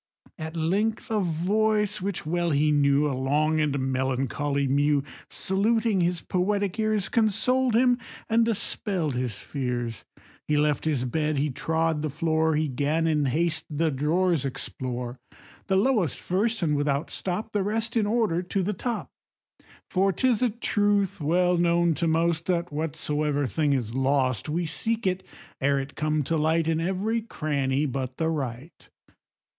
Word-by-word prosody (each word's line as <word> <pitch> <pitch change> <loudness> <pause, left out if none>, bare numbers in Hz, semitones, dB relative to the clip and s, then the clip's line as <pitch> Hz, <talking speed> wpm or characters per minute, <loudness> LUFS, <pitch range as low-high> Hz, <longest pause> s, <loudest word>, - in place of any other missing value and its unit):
At 160 +1 -5
length 205 +9 0
a 215 - +2
voice 205 +4 +1
which 195 -3 -3
well 170 +2 0
he 150 0 +2
knew, 145 0 +3
A 140 - -1
long 150 +4 +1
and 150 -2 +1
melancholy 135 +2 -1
mew, 145 +1 +2 0.3
Saluting 215 +1 +1
his 175 0 0
poetic 200 +2 -1
ears, 215 -2 +1
Consoled 235 +3 +2
him 245 +1 +4 0.3
and 230 +1 +3
dispell'd 195 - -1
his 125 -4 -2
fears: 120 -4 -4 0.4
He 150 - +2
left 150 0 +1
his 140 -5 0
bed, 150 +3 -1
he 145 +1 0
trod 160 +2 0
the 155 - -1
floor, 160 +2 +1
He 155 +1 +1
'gan 145 +5 0
in 150 -3 +2
haste 160 +4 0
the 155 +1 0
drawers 160 +3 +1
explore, 125 -2 -4 0.5
The 190 - +2
lowest 200 - +2
first, 215 +3 0
and 150 -3 +2
without 145 +1 0
stop 195 +4 -3
The 205 - 0
rest 225 +4 -1
in 215 -3 +2
order 210 -6 +1
to 185 +1 -2
the 210 +4 -1
top. 235 +5 -4 0.8
For 195 +1 +2
'tis 240 +5 +1
a 250 - +3
truth 205 -4 0
well 175 +4 +2
known 170 0 +3
to 170 - +2
most, 165 0 +1
That 175 -3 -1
whatsoever 150 -1 -1
thing 145 +4 +1
is 120 -4 -2
lost, 130 -3 +1
We 170 +3 -1
seek 220 +9 -1
it, 185 0 0 0.4
ere 140 +1 +2
it 135 +1 -6
come 155 -1 0
to 160 +4 0
light, 160 +1 +2
In 165 0 +1
every 195 +6 0
cranny 145 -8 -1
but 130 -2 -4
the 160 0 0
right. 140 -1 -5
160 Hz, 160 wpm, -26 LUFS, 145-195 Hz, 0.8 s, him